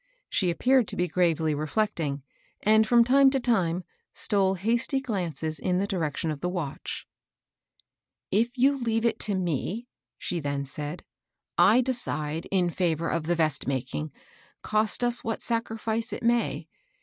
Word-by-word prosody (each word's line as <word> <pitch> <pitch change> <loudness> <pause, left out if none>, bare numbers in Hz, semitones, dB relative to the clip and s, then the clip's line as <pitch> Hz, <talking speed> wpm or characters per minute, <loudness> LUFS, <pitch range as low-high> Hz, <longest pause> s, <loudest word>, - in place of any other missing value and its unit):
She 185 - +2
appeared 250 +7 +3
to - - -2
be 180 - 0
gravely 165 -2 +1
reflecting, 155 -2 -1 0.4
and, 220 +1 +5
from 235 +1 +6
time 270 +3 +5
to 270 0 0
time, 185 -8 +1 0.3
stole 195 -2 +2
hasty 235 - +1
glances 170 - -3
in 180 +3 0
the 195 - +1
direction 165 -5 -2
of 150 - -5
the 180 - -2
watch. 175 -7 -4 0.6
" - - -38 0.5
If 235 +6 +1
you 275 +2 +3
leave 225 -1 0
it 230 - +1
to 205 - 0
me," 185 - -2 0.3
she 175 - -2
then 140 -2 -2
said, 145 +4 -5 0.3
" - - -62
I 245 +4 +5
de 260 +1 0
cide 155 -8 -2
in 180 -3 +1
favor 165 -2 0
of 160 -2 -2
the 175 - +2
vest 155 -6 0
making, 135 +3 -3 0.5
cost 215 +2 +1
us 240 0 +2
what 225 - -3
sac 230 -1 +1
rifice 225 +1 -2
it 210 - -5
may. 235 0 +1
190 Hz, 165 wpm, -27 LUFS, 160-230 Hz, 0.6 s, from